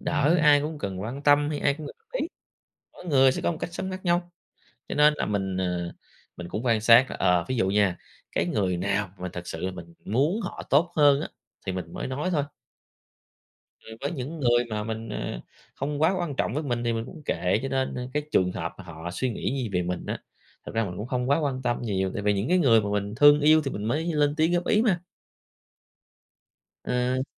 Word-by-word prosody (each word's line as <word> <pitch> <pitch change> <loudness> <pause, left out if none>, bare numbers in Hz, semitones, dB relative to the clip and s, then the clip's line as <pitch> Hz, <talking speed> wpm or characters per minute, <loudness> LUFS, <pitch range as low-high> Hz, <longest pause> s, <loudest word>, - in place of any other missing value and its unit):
đỡ, 150 +3 +2
ai 145 -1 +6
cũng 150 +1 -4
cần 95 -7 -4
quan 120 +8 -5
tâm 145 0 +4
hay 150 - -2
ai 140 - +2
cũng 155 0 -8
cần - - -10
góp 455 +1 -41
ý, - - -1 0.6
mỗi - - -13
người 135 -4 +5
sẽ - - -3
có - - +2
một 160 - -7
cách 170 - -4
sống 190 - -3
khác 185 0 -7
nhau. 175 0 +1 0.6
Cho - - -4
nên 150 +1 +6
là - - -1
mình, 95 -2 -1
ờ, 90 -2 -2 0.4
mình 90 - -6
cũng 105 +5 -4
quan 115 -4 +2
sát 120 +3 +6
là, - - -4
ờ, 90 -2 +3
ví 130 - -1
dụ 105 -6 +1
nha, 100 -3 +2 0.3
cái - - 0
người 90 0 0
nào 100 +2 -1
mà 90 0 -5
thực 90 0 -7
sự 80 - -5
là 95 +2 -2
mình 85 -2 -10
muốn 145 - +1
họ 185 - -6
tốt 165 +5 +3
hơn 145 -2 +5
á - - -3 0.4
thì - - -1
mình 90 -3 -6
mới - - -4
nói 140 +7 -2
thôi. 145 -4 +1 1.4
Ừ, 110 - -11
với 140 - -2
những 150 +3 -5
người 120 -2 +3
mà 105 -1 -2
mình, 110 +1 -5
ờ, 105 - -4 0.3
không 145 +2 -3
quá 165 +4 +4
quan 155 -6 -3
trọng - - 0
với 150 - -1
mình 120 -4 -2
thì 120 - +1
mình 115 0 -2
cũng 160 0 -11
kệ. 90 -4 +1
Cho 135 - -2
nên, 135 -1 -1
a, 125 - -4
cái 150 - +1
trường 90 -7 +3
hợp 85 -1 -4
mà 95 - -9
họ 85 0 -7
suy 130 +7 -1
nghĩ 115 - -2
gì 115 - -2
về 90 -2 0
mình 90 0 -4
á, - - -3 0.5
thực - - -7
ra 115 0 +2
mình 90 -3 -5
cũng 105 +5 -5
không 125 0 -1
quá 140 - +4
quan 135 -4 -2
tâm 120 0 -1
nhiều 95 -4 -1
tại 105 - -3
vì 105 0 +3
những 100 +4 -1
cái 185 - +4
người 120 -9 +5
mà 100 -1 -3
mình 100 0 -2
thương 145 +2 +7
yêu 155 +1 +5
thì 135 - -2
mình 105 - -5
mới 145 +9 0
lên 145 -1 +2
tiếng 160 +2 +2
góp 175 0 0
ý 215 - +3
mà. 190 -7 +1 1.8
Ờ. 125 +1 0
125 Hz, 245 wpm, -26 LUFS, 100-150 Hz, 1.8 s, thương